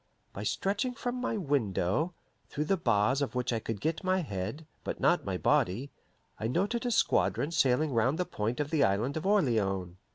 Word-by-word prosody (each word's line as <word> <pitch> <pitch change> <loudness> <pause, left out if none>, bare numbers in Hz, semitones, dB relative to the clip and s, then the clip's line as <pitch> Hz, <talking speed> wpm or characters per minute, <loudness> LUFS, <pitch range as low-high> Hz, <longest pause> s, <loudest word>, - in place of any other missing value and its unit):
By 100 - -6
stretching 205 - -1
from 245 +1 -3
my 240 -3 -1
window, 145 - 0 0.3
through 150 - -2
the 195 - +2
bars 125 - +2
of 140 -2 -2
which 125 -1 0
I 115 - 0
could 110 -1 -4
get 160 - -2
my 185 0 +2
head, 120 - -4 0.2
but - - -4
not - - +3
my - - -1
body, 115 +10 +1 0.5
I 110 - -1
noted 215 - 0
a - - 0
squadron 160 -7 +2
sailing 140 -1 +2
round 125 +6 +2
the 180 - 0
point 110 0 -3
of 145 -1 -2
the 155 -3 +3
Island 105 +8 +1
of 160 +4 -2
Orleans. 100 - +1
140 Hz, 190 wpm, -30 LUFS, 110-180 Hz, 0.5 s, not